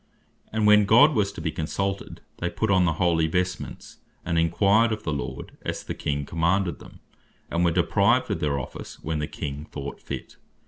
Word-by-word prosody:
And 110 -1 0
when 105 0 +6
God 130 +10 +6
was 105 -5 +1
to - - -7
be 80 -1 -1
consulted, 95 +5 -3 0.2
they 90 - -1
put 100 +4 -1
on 95 -2 +4
the 80 - +2
holy 80 -1 +2
vestments, 90 +2 -3 0.3
and 85 -1 +1
enquired 100 +7 +3
of 110 -1 -3
the 75 - -1
Lord, 70 - -5
as - - -4
the - - -4
King 70 -1 -2
commanded 85 +4 0
them, - - -14 0.5
and 85 +1 +1
were 85 - +4
deprived 85 0 +2
of - - -1
their 70 -2 0
office, 70 - -7
when 80 0 -2
the 75 - -2
King 70 +1 -5
thought 70 -2 -7
fit. - - -7
85 Hz, 190 wpm, -25 LUFS, 80-100 Hz, 0.5 s, when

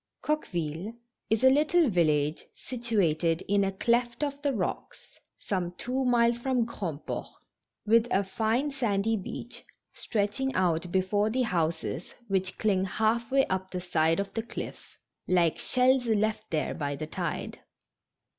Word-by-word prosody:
OQUEVILLE 180 - -2 0.4
is 220 +2 +1
a 260 - +8
little 310 +4 +4
village 155 - +2
situated 185 -9 0
in 200 0 +3
a 195 - 0
cleft 235 +5 0
Ay - - +3
of 280 0 -14
the 285 -1 +1
rocks, 205 -8 -3 0.4
some 180 -3 -3
two 260 +2 -1
miles 240 -1 +3
from 250 -2 +1
Grandport, 170 -10 -4 0.6
with 230 +2 +4
a 195 -2 +2
fine 225 +8 0
sandy 225 -5 0
beach, 195 - -6 0.3
stretching 220 +5 -1
out 175 -1 +1
before 200 +3 +2
the 255 +3 +1
hcmses 170 -3 -2 0.2
wliich 190 -1 0
cling 195 -3 +2
half 220 +4 0
way 270 0 +4
up 190 0 -2
the 180 - -4
side 165 -1 +1
of 200 0 -3
the 225 - -1
cliff, 230 - -8 0.3
like 175 -3 +2
shells 255 0 +3
left 215 0 0
there 155 -2 -1
by 145 -1 -3
the 155 - -4
tide. 155 - -4
210 Hz, 145 wpm, -28 LUFS, 180-240 Hz, 0.6 s, a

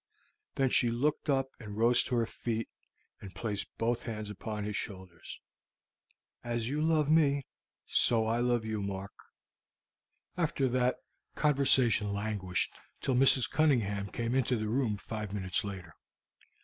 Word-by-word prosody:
Then 135 -2 +1
she 120 - +4
looked 145 +7 -1
up 135 -1 +1
and 105 -3 -8
rose 120 +2 +5
to 125 - -2
her 115 -1 +2
feet, 115 0 -4 0.5
and 95 -2 -10
placed 105 0 -3
both 120 +1 0
hands 110 -2 -5
upon 105 +1 -5
his 105 0 -4
shoulders. 95 -6 -7 1.0
"As 120 -1 -2
you 145 +4 -1
love 155 -2 +2
me, 145 -3 +3 0.4
so 115 -2 +5
I 115 +2 0
love 120 -2 +1
you, 110 -1 -3
Mark." 100 0 -5 1.2
After 155 -5 0
that, 125 0 +1 0.4
conversation 130 -7 +3
languished 100 -3 -2 0.3
till 135 - -1
Mrs. 130 -1 +4
Cunningham 110 -10 +1
came 115 +3 -3
into 130 -1 +1
the 110 -1 -3
room, 115 -3 0
five 105 0 -6
minutes 95 -3 -1
later. 95 -5 -7
115 Hz, 140 wpm, -31 LUFS, 105-130 Hz, 1.2 s, rose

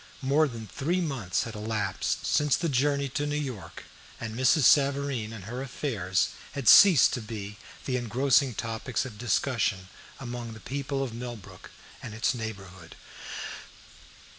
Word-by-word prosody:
More 145 +4 +3
than 115 -4 -7
three 160 - -1
months 135 - -1
had 115 - -7
elapsed 105 -1 -2
since 150 -2 +3
the 170 - -1
journey 140 +1 +1
to 145 +3 -2
New 145 - -2
York, 125 - -6 0.4
and 110 -1 -5
Mrs. 130 +4 +3
Savareen 140 -4 +3
and 110 -4 -8
her 120 +5 -5
affairs 110 -9 -1 0.2
had 135 -4 -4
ceased 180 - +8
to 125 - -2
be 105 -2 -7 0.3
the 130 -2 0
engrossing 130 +1 +2
topics 115 +2 -3
of 110 -5 -9
discussion 115 -6 0 0.3
among 120 -2 -6
the 110 - -11
people 140 +2 -3
of 125 -4 -5
Millbrook 120 -3 -8 0.3
and 105 - -7
its 110 - +1
neighborhood. 95 -7 -8
120 Hz, 145 wpm, -28 LUFS, 110-140 Hz, 0.4 s, ceased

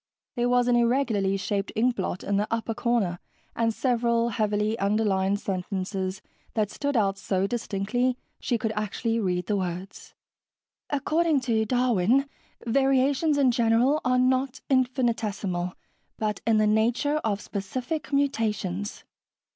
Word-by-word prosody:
There 240 -1 +1
was 245 0 +3
an 245 - +4
irregularly 235 -5 +2
shaped 200 0 -2
inkblot 220 -5 0
in 200 0 0
the 210 +1 0
upper 230 0 -1
corner 220 -7 0 0.4
and 230 -1 +1
several 235 -1 +1
heavily 210 -1 0
underlined 200 -1 +1
sentences 190 0 -3 0.3
that 215 -3 0
stood 285 -2 -1
out 195 -2 +1
so 190 0 0
distinctly 240 +3 -1 0.2
she 240 - 0
could 220 0 -2
actually 220 +2 -1
read 180 -4 -1
the 205 +2 0
words. 185 +1 -5 0.7
"According 305 +1 +1
to 225 -3 +1
Darwin, 250 +1 +2 0.4
variations 275 +4 +2
in 270 -3 +4
general 235 +5 +3
are 255 0 +2
not 255 +1 +1
infinitesimal, 225 -8 0 0.4
but 215 -1 -2
in 225 -1 +4
the 215 - +4
nature 230 +8 +2
of 215 -8 -1
specific 250 - -4
mutations. 215 -8 -1
225 Hz, 130 wpm, -26 LUFS, 200-250 Hz, 0.7 s, an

